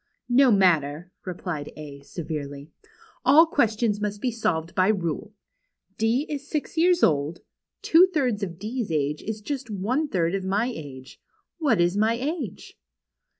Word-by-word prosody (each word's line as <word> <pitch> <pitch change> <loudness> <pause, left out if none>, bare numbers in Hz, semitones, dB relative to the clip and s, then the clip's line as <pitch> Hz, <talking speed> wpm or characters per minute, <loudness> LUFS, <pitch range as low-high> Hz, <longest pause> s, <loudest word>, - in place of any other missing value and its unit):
" - - -60 0.2
No 265 - +5
matter," 175 -4 +2 0.2
replied 175 -4 -5
A, 145 -2 -9
severely. 145 -2 -6 0.3
" - - -28
All 300 +5 +7
questions 225 -8 +1
must 205 -1 -2
be 250 +3 -1
solved 170 -8 -2
jjy 195 +2 +2
rule. 170 +5 -4 0.6
D 230 +6 +2
is 285 -1 -5
six 300 0 -3
years 350 +2 +3
old. 150 +1 +2 0.4
Two 345 +3 +6
thirds 255 - 0
of 175 -4 -4
D's 220 0 -4
age 150 -1 -1
is 220 0 -5
just 270 +1 -5
one 225 +10 -1
third 175 -8 0
of 195 -1 -1
my 205 +6 0
age. 130 -4 -10 0.4
What 275 - +2
is 175 +2 +2
my 220 +2 +2
age 275 - -5
205 Hz, 155 wpm, -25 LUFS, 165-250 Hz, 0.6 s, All